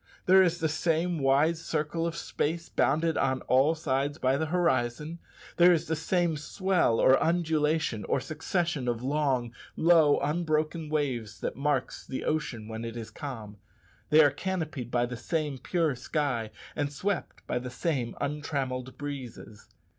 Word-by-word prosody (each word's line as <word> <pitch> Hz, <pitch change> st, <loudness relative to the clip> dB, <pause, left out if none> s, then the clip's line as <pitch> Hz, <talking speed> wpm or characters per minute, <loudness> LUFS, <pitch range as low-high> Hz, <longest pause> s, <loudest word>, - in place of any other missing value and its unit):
There 190 Hz, +1 st, +7 dB
is 175 Hz, -2 st, +2 dB
the 165 Hz, -2 st, 0 dB
same 165 Hz, +2 st, 0 dB
wide 140 Hz, +4 st, +3 dB
circle 160 Hz, +1 st, -2 dB
of 165 Hz, -, -4 dB
space 165 Hz, 0 st, -2 dB
bounded 160 Hz, +3 st, +1 dB
on 130 Hz, -1 st, +1 dB
all 135 Hz, +5 st, +3 dB
sides 145 Hz, -2 st, -1 dB
by 130 Hz, -2 st, +2 dB
the 160 Hz, +3 st, -1 dB
horizon; 155 Hz, -2 st, 0 dB, 0.4 s
there 175 Hz, +1 st, +7 dB
is 165 Hz, -1 st, +2 dB
the 160 Hz, 0 st, -1 dB
same 170 Hz, 0 st, 0 dB
swell, 180 Hz, -, +1 dB
or 130 Hz, -, +5 dB
undulation, 160 Hz, -7 st, +1 dB
or -, -, +1 dB
succession 160 Hz, -3 st, -2 dB
of 120 Hz, 0 st, -1 dB
long 135 Hz, -4 st, 0 dB, 0.2 s
low 160 Hz, -3 st, +5 dB
unbroken 155 Hz, +1 st, -1 dB
waves 125 Hz, -9 st, -2 dB
that -, -, -3 dB
marks 145 Hz, +3 st, -1 dB
the 130 Hz, -, -5 dB
ocean 135 Hz, -8 st, -2 dB
when 110 Hz, 0 st, -6 dB
it 115 Hz, 0 st, -5 dB
is 115 Hz, -2 st, -7 dB
calm; 115 Hz, -8 st, -7 dB, 0.5 s
they 155 Hz, +1 st, +7 dB
are 145 Hz, -, +5 dB
canopied 155 Hz, -6 st, -3 dB
by 120 Hz, 0 st, +1 dB
the 120 Hz, 0 st, -6 dB
same 150 Hz, +1 st, -2 dB
pure 165 Hz, +1 st, 0 dB
sky, 125 Hz, -3 st, -2 dB, 0.3 s
and 145 Hz, -1 st, -1 dB
swept 190 Hz, +6 st, -3 dB
by -, -, -1 dB
the 125 Hz, +1 st, -6 dB
same 125 Hz, -2 st, -2 dB
untrammelled 135 Hz, -3 st, -3 dB
breezes. 130 Hz, -7 st, -8 dB
150 Hz, 155 wpm, -28 LUFS, 130-165 Hz, 0.5 s, There